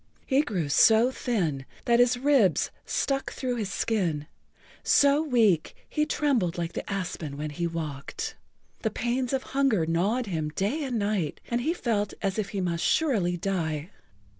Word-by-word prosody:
He 270 +1 +3
grew 195 - -2
so 220 - +5
thin 175 - -1 0.2
that 235 0 +4
his 245 0 +4
ribs 255 - +3 0.2
stuck 275 -1 -1
through 250 -2 -3
the 220 - -1
skin, 180 -7 -1 0.6
so 285 +1 +5
weak 225 - +2
he 300 0 0
trembled 240 - +1
like 170 0 -3
the - - -5
aspen 175 -7 -4
when 150 +1 -4
he 170 +3 -2
walked. 165 - -5 0.4
The 220 - 0
pains 245 +2 -1
of 265 -1 0
hunger 265 -11 +1
gnawed 195 +10 +1
him 160 -6 -2
day 235 +11 0
and 250 -3 -2
night 200 -7 -1
and 235 +1 +1
he 320 +7 0
felt 210 - -1
as 195 +1 0
if 200 -2 -2
he 195 -1 -3
must 170 -2 -1
surely 205 - +2
die. 165 -3 -2
210 Hz, 165 wpm, -27 LUFS, 170-250 Hz, 0.6 s, so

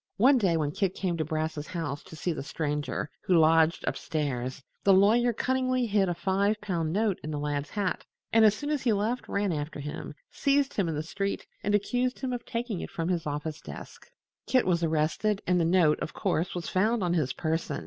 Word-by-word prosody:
One 255 +5 +5
day, 180 -6 +2
when 150 -2 0
Kit 190 +2 -1
came 180 -3 -1
to 160 - 0
Brass's 155 0 -3
house 145 -5 -4
to - - -11
see 170 +2 -2
the - - -5
Stranger, 145 +1 -2 0.2
who 180 - +3
lodged 160 0 +4
up - - 0
stairs, 135 -3 -3 0.2
the 200 - +6
lawyer 225 +5 +5
cunningly 255 +1 0
hid 200 -4 +2
a 175 - -1
five 200 +4 +1
pound 170 -6 -2
note 205 0 +1
in 155 - -5
the 150 - -3
lad's 145 0 -2
hat 200 -3 -2 0.3
and 225 0 +6
as 215 -1 +6
soon 290 +7 -4
as 295 -3 0
he 235 -4 +2
left 215 +5 -1
ran 200 -1 0
after 150 -1 -4
him, 145 +1 -6 0.2
seized 280 -1 +1
him 190 -5 0
in 160 - -2
the 150 - -2
street 200 +4 -3 0.2
and 205 +1 +1
accused 245 +5 0
him 260 -2 -2
of 240 -1 -4
taking 230 -5 -3
it - - -5
from 165 +1 -3
his 170 -4 -1
office 150 +1 -4
desk. - - -10 0.4
Kit 255 - +3
was 175 -2 +2
arrested, 165 +7 +1
and 180 -1 +2
the - - +2
note, 165 -3 +4
of - - -5
course, 180 -2 -1
was 175 -2 -4
found 215 +3 +1
on 175 -1 +1
his 150 -7 +1
person. 160 0 -2
180 Hz, 220 wpm, -28 LUFS, 155-215 Hz, 0.4 s, the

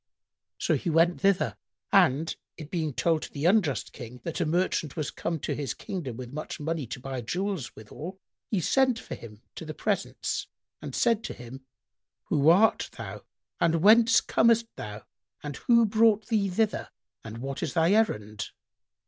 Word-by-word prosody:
So - - +1
he 180 - -3
went 165 +2 +3
thither; 185 - +2 0.3
and, 150 +5 +4 0.2
it 155 -2 -9
being 160 -4 -1
told 160 +4 +1
to - - -7
the 145 +2 -4
unjust 175 -7 +2
King 125 +1 -9
that 170 +1 -3
a 165 - +1
merchant 165 -3 0
was 155 -3 -2
come 165 -1 -3
to - - -2
his 140 -5 -3
kingdom 145 - -5
with 125 0 -8
much 155 +1 -5
money 155 -3 -2
to 125 - -6
buy 130 0 -5
jewels 180 - -3
withal, 160 - -9 0.3
he 200 -5 0
sent 260 - +3
for - - -8
him 105 -2 -11
to - - -8
the 155 -1 -7
presence 205 -2 -2 0.3
and - - -6
said 230 -2 +2
to - - -5
him, 130 +2 -11 0.6
"Who 145 +2 +4
art 200 +7 +4
thou - - -7 0.4
and 165 0 +2
whence 225 +2 +7
comest 230 0 +3
thou 105 0 -7 0.4
and 145 -2 -5
who 235 -1 +4
brought 215 0 +3
thee 210 -4 +2
thither 215 +3 0 0.3
and 110 0 -8
what 135 +3 -5
is - - -3
thy 165 +1 +4
errand?" 110 - +1
165 Hz, 175 wpm, -28 LUFS, 135-200 Hz, 0.6 s, whence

